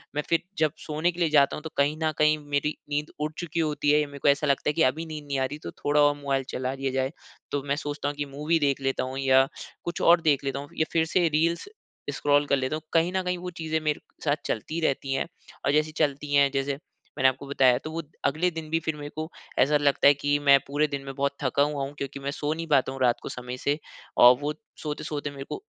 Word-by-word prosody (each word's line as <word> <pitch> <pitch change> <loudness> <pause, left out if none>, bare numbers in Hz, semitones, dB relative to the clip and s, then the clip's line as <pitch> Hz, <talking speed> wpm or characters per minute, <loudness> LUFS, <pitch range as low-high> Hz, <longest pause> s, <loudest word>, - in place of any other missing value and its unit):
मैं 150 - +1
फिर 165 - +3 0.2
जब 155 -2 +3 0.2
सोने 155 +3 +1
के 175 - -11
लिए 170 -3 +3
जाता 140 -2 +4
हूँ, 150 - -8
तो 160 - -5
कहीं 145 +2 +3
न 155 - +2
कहीं 150 0 +4
मेरी 145 +1 0
नींद 150 +1 -2
उड़ 150 +1 -1
चुकी 170 -1 -3
होती 150 -2 +1
है, 150 - +5
या 150 - -2
मेरे 140 0 -10
को - - 0
ऐसा 145 +2 +2
लगता 140 +1 +2
है 150 - +1
कि 165 - 0
अभी 160 +4 -5
नींद 155 -2 -7
नहीं 140 -1 -1
आ 130 - +2
रही, 145 +3 -5
तो - - -7
थोड़ा 145 +1 +3
और 145 0 +4
मोबाइल 140 -2 -1
चला 130 +1 -2
लिया 135 0 -2
जाए। 130 +1 0 0.4
तो 145 -1 -1
मैं 140 - +1
सोचता 145 0 -3
हूँ 145 - -5
कि 145 - -2
मूवी 160 +3 +1
देख 140 -2 +1
लेता 135 -1 0
हूँ 130 +1 -5
या 135 0 +5 0.4
कुछ 175 - -3
और 170 0 +6
देख 145 -4 +2
लेता 140 0 -2
हूँ, 145 - -8
या 160 - +2
फिर 160 -1 +2
से 175 -2 +5
रील्स 165 - +1 0.5
स्क्रॉल 145 +1 +2
कर 140 - +3
लेता 130 +3 -1
हूँ। 155 - -5
कहीं 170 +2 +3
न 190 - +2
कहीं 180 0 -1
वो 180 +1 -5
चीज़ें 160 0 0
मेरे 150 -1 0 0.3
साथ 145 -1 +3
चलती 155 +9 -2
रहती 135 0 -1
हैं, 135 - -1 0.4
और 140 - +3
जैसे 155 +1 +2
चलती 145 0 -2
है 140 -1 +6
जैसे 135 0 -1 0.4
मैंने 130 0 +5
आपको 135 +2 -7
बताया, 130 -3 +4
तो 155 +4 -7
वो 165 +1 -3 0.2
अगले 160 +6 +2
दिन 160 -1 -7
भी 165 +1 +1
फिर 160 -1 -3
मेरे 145 0 -7
को 155 +1 -4 0.3
ऐसा 150 +2 +5
लगता 140 -1 +3
है 145 - +8
कि 145 +1 +1
मैं 140 -1 +6
पूरे 145 +2 +1
दिन 140 -1 -4
में 135 0 -6
बहुत 140 0 0
थका 135 +2 +3
हुआ 145 -1 -1
हूँ 140 +1 -5
क्योंकि 140 0 -5
मैं 140 +1 -3
सो 145 +1 -2
नहीं 165 +1 -5
पाता 135 -3 +3
हूँ 135 - -7
रात 120 -1 +4
को - - -6
समय 125 0 -6
से, 145 +3 0 0.4
और 125 +1 +9
वो 150 +1 -1 0.3
सोते-सोते 150 -1 -3
मेरे 140 -1 -7
को - - -5
145 Hz, 265 wpm, -26 LUFS, 140-155 Hz, 0.5 s, और